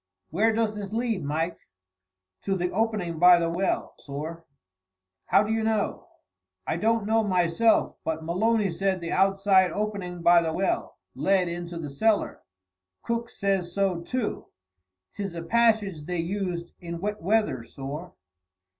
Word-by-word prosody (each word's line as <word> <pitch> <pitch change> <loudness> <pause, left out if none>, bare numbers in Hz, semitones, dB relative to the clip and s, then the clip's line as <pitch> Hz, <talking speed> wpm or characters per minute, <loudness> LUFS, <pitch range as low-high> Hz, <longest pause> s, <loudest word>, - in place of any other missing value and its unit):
"Where 215 +8 +3
does 220 -1 0
this 205 -1 -6
lead, 225 -5 -1
Mike?" 160 +4 -2 0.9
"To 195 - +1
the 180 -1 -1
opening 205 -7 -1
by 180 0 +8
the 170 -1 0
well, 185 +3 -1
sorr." 155 +4 -7 0.8
"How - - +5
do 215 +1 -1
you 225 0 0
know?" 220 -2 -1 0.6
"I - - -1
don't 225 +2 +1
know, 225 +1 +2
myself, 185 +3 +2
but 160 0 -2
Maloney 200 +4 +1
said 190 +2 0
the 170 -1 -5
outside 195 -1 +3
opening 200 -4 -4
by 170 0 +6
the 160 -1 -2
well 190 +3 -1 0.2
led 190 -2 +2
into 170 0 -5
the 150 -4 -5
cellar; 215 +9 +1 0.6
Cook 235 0 -2
says 190 -3 -1
so, 195 -4 +1
too. 245 +5 -3 0.7
'Tis 195 -4 -5
a 165 - -5
passage 215 -6 +2
they 180 0 -2
used 175 -1 -3
in 170 -1 -6
wet 210 +3 -3
weather, 200 - +1
sorr." 140 +8 -7
190 Hz, 145 wpm, -26 LUFS, 170-215 Hz, 0.9 s, by